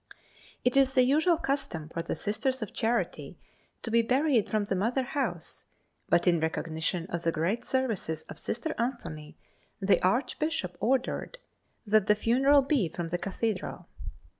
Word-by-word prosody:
It 250 - +2
is 270 -1 +4
the 255 - +5
usual 310 +6 +3
custom 270 - -2
for 165 - -3
the - - -3
Sisters 260 +4 -1
of 210 - -8
Charity 230 +2 -1 0.5
to 230 - -4
be 230 +1 +5
buried 255 0 +2
from 215 -1 +1
the 200 - -1
mother 235 +8 +1
house, 240 - -3 0.4
but 170 - +3
in 175 -2 +4
recognition 160 +1 -2
of 170 - -2
the 165 - +1
great 170 +9 -1
services 220 -12 -1
of - - -7
Sister 310 +7 -3
Anthony 230 - -4 0.4
the 195 0 +3
Archbishop 250 - 0
ordered 260 - 0 0.5
that 215 -1 +3
the 210 - +5
funeral 270 +6 +4
be 265 - +1
from 170 +1 -5
the 175 +1 -2
Cathedral. 200 +1 -3
225 Hz, 155 wpm, -29 LUFS, 175-265 Hz, 0.5 s, the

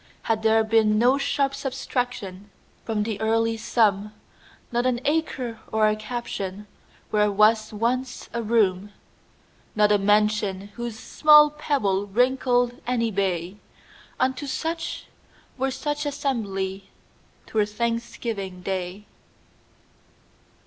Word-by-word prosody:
Had 225 -1 0
there 220 0 +4
been 220 -1 +3
no 250 +5 +4
sharp 275 0 0
subtractionFrom 230 -6 -4
the 215 -1 -4
early 225 +1 +1
sum, 210 -2 +1 0.6
Not 240 +1 +1
an 245 -2 +1
acre 270 -7 -1
or 220 0 +3
a 215 - +2
captionWhere 210 -2 -4
was 215 +2 +3
once 245 +4 -2
a 235 - -1
room, 205 -3 +1 0.8
Not 210 -1 +4
a 205 - +4
mention, 205 -1 +1
whose 235 +1 -6
small 300 +4 +6
pebbleWrinkled 245 -1 +1
any 230 -2 0
bay,—Unto 200 - -4
such, 325 +5 -3 0.5
were 270 0 -1
such 295 +3 -3
assembly,'T 195 -9 -5
were 210 -2 +2
Thanksgiving 225 -4 -3
day. 190 +1 -4
220 Hz, 100 wpm, -24 LUFS, 205-250 Hz, 0.8 s, small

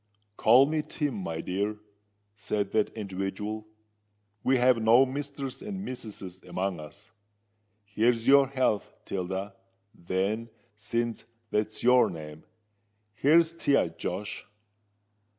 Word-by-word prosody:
"Call 120 +6 +6
me 155 +2 0
Tim, 150 -2 -2
my 85 -6 -4
dear," 100 +3 -2 0.6
said 100 0 -2
that 110 -1 +1
individual 105 +2 -4 0.8
"We 130 0 +3
have 125 -1 +4
no 115 +4 +6
misters 140 -1 -5
and 200 -1 -5
missuses 100 -7 -7
among 95 -2 -3
us. 100 +8 -12 0.7
Here's 115 +3 +1
your 140 0 +7
health, 130 -6 0
Tilda, 95 +1 -4 0.4
then—since 110 +4 -3 0.3
that's 105 +1 -1
your 125 +1 +5
name: 75 -1 -9 0.7
here's 160 +9 +4
to 145 -4 0
ye, 115 - +4
Josh." 95 +5 -4
110 Hz, 110 wpm, -28 LUFS, 95-130 Hz, 0.8 s, your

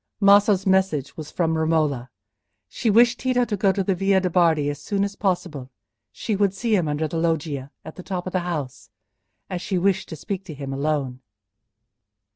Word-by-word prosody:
Maso's 200 -1 +5
message 190 -7 +1
was 155 -2 -8
from 165 -2 0
Romola. 155 -6 0 0.6
She 220 - -2
wished 235 +3 +4
Tito 250 -1 +1
to 220 - -2
go 195 0 +2
to 195 0 -1
the 195 - +1
Via 195 +1 +2
de' 185 -1 -2
Bardi 165 -4 +3
as 145 -1 -4
soon 200 +6 -1
as 200 0 -3
possible. 175 -10 -2 0.4
She 215 - -3
would 200 -1 +1
see 225 +1 +1
him 175 -5 +1
under 150 +1 -1
the 165 - -4
loggia, 155 -5 -1 0.2
at 155 - -10
the - - -7
top 180 -2 -4
of 185 - -5
the 185 - +2
house, 155 -7 -5 0.6
as 180 -2 -4
she 190 - -2
wished 190 +1 0
to - - -6
speak 195 +5 -5
to 160 -5 -8
him 135 -1 -6
alone. 135 -3 -2
175 Hz, 195 wpm, -23 LUFS, 150-195 Hz, 0.6 s, Maso's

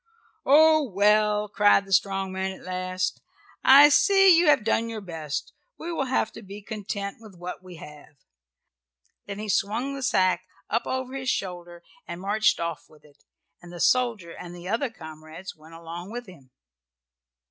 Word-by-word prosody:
"Oh, 310 +2 +6
well!" 210 +1 +2
cried 205 -1 +3
the 195 - -5
strong 195 0 +1
man 190 0 -3
at - - -16
last, 185 0 -3 0.4
"I 285 +2 +8
see 390 +3 +5
you 335 0 +3
have 285 -7 +4
done 225 +1 0
your 225 -1 -5
best; 160 -6 -6 0.2
we 340 - -6
will 280 -4 -1
have 255 -4 0
to - - -11
be 200 0 -11
content 200 -2 -5
with 215 -4 -14
what 175 +1 -8
we 185 -1 -12
have." 150 -1 -13 1.1
Then 200 -1 -6
he 215 +1 -6
swung 215 +7 -1
the 275 - -6
sack 185 -7 +1 0.2
up 230 - 0
over 260 0 -3
his 260 -1 -3
shoulder 175 -2 -4 0.2
and 170 0 -7
marched 210 +3 +1
off 170 -2 -5
with 150 -1 -21
it, 145 -1 -23 0.4
and 175 0 -13
the 175 - -9
soldier 230 -6 +1
and 175 0 -10
the 175 0 -10
other 230 +7 -1
comrades 160 -2 -11
went 160 +1 -16
along 170 +2 -8
with 245 +1 -6
him. 165 - -16
200 Hz, 170 wpm, -25 LUFS, 175-230 Hz, 1.1 s, I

